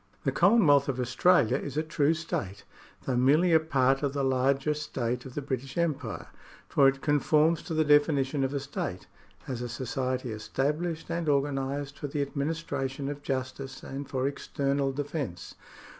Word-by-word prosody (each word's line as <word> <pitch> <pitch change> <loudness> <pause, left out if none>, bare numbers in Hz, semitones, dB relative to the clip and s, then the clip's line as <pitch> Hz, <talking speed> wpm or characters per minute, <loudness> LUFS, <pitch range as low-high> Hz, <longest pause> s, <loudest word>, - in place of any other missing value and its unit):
The 135 - +1
Commonwealth 150 - +5
of 130 -2 -2
Australia 125 0 +3
is 145 0 -6
a 155 - +2
true 155 0 +1
state, 105 - -4 0.4
though 130 - 0
merely 150 +8 +4
a 160 - +7
part 135 -4 +2
of 140 -2 -1
the 140 -1 -1
larger 135 +3 +2
state 125 -5 -3
of 125 - -12
the 145 - -3
British 135 0 -4
Empire, 145 -10 -2 0.4
for 140 - +4
it 135 0 +1
conforms 150 +2 +3
to 165 - -5
the 155 0 +2
definition 145 -2 +3
of 135 - 0
a 140 - -1
state, 135 -9 -5 0.4
as 125 -2 -4
a 120 - -4
society 130 +1 -3
established 150 +10 -2
and 170 -2 -1
organised 140 0 -1
for 145 - -3
the 145 0 -1
administration 140 -2 -3
of 145 0 -6
justice 135 -1 -4
and 140 +1 -6
for 130 0 0
external 140 0 -1
defence. 140 - -4
140 Hz, 165 wpm, -28 LUFS, 130-150 Hz, 0.4 s, a